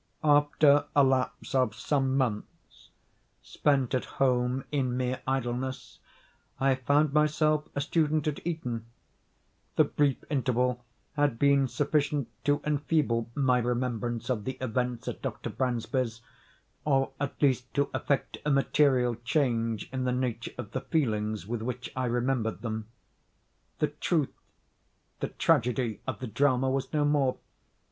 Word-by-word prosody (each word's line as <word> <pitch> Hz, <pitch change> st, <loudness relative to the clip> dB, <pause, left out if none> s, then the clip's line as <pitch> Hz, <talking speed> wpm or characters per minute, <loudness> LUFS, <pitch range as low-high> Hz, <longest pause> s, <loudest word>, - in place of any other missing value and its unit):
After 145 Hz, -1 st, +5 dB
a 145 Hz, -, +7 dB
lapse 130 Hz, +1 st, 0 dB
of 130 Hz, -1 st, +2 dB
some 135 Hz, -2 st, 0 dB
months, 115 Hz, -6 st, -4 dB, 0.5 s
spent 140 Hz, -4 st, +1 dB
at 130 Hz, -, 0 dB
home 125 Hz, 0 st, +2 dB
in 130 Hz, -4 st, 0 dB
mere 130 Hz, 0 st, -1 dB
idleness, 130 Hz, 0 st, -3 dB, 0.6 s
I 135 Hz, 0 st, +3 dB
found 145 Hz, +3 st, +2 dB
myself 150 Hz, 0 st, +2 dB
a 140 Hz, -, 0 dB
student 155 Hz, 0 st, +1 dB
at 150 Hz, -, -2 dB
Eton. 125 Hz, -9 st, -3 dB, 0.9 s
The -, -, +6 dB
brief 145 Hz, -3 st, +1 dB
interval 125 Hz, -3 st, 0 dB, 0.3 s
had 145 Hz, -5 st, +1 dB
been 140 Hz, 0 st, +4 dB
sufficient 145 Hz, -1 st, 0 dB, 0.2 s
to 145 Hz, 0 st, +2 dB
enfeeble 145 Hz, -6 st, +1 dB
my 130 Hz, -3 st, +3 dB
remembrance 120 Hz, -1 st, -2 dB
of 110 Hz, -5 st, -1 dB
the 130 Hz, -, -2 dB
events 125 Hz, -1 st, -2 dB
at -, -, -4 dB
Dr. -, -, -4 dB
Bransby's, 120 Hz, -2 st, -1 dB, 0.6 s
or 135 Hz, -2 st, +2 dB
at 140 Hz, 0 st, -3 dB
least 130 Hz, -3 st, +1 dB
to 140 Hz, -1 st, +1 dB
effect 140 Hz, -2 st, -1 dB
a 150 Hz, -, 0 dB
material 135 Hz, -3 st, +3 dB
change 115 Hz, -5 st, 0 dB
in 130 Hz, -1 st, -2 dB
the 125 Hz, -, +1 dB
nature 125 Hz, -2 st, -2 dB
of 115 Hz, -4 st, -6 dB
the 130 Hz, -, -3 dB
feelings 110 Hz, -, -1 dB
with 115 Hz, +1 st, -3 dB
which 125 Hz, +1 st, -4 dB
I 130 Hz, 0 st, -1 dB
remembered 120 Hz, -1 st, -1 dB
them. 110 Hz, -2 st, -3 dB, 0.9 s
The -, -, +1 dB
truth—the 155 Hz, -6 st, -5 dB
tragedy—of 125 Hz, -5 st, 0 dB
the 130 Hz, -, -4 dB
drama 130 Hz, +3 st, +2 dB
was 135 Hz, 0 st, -2 dB
no 150 Hz, -1 st, +2 dB
more. 145 Hz, -3 st, +2 dB
130 Hz, 135 wpm, -29 LUFS, 120-145 Hz, 0.9 s, a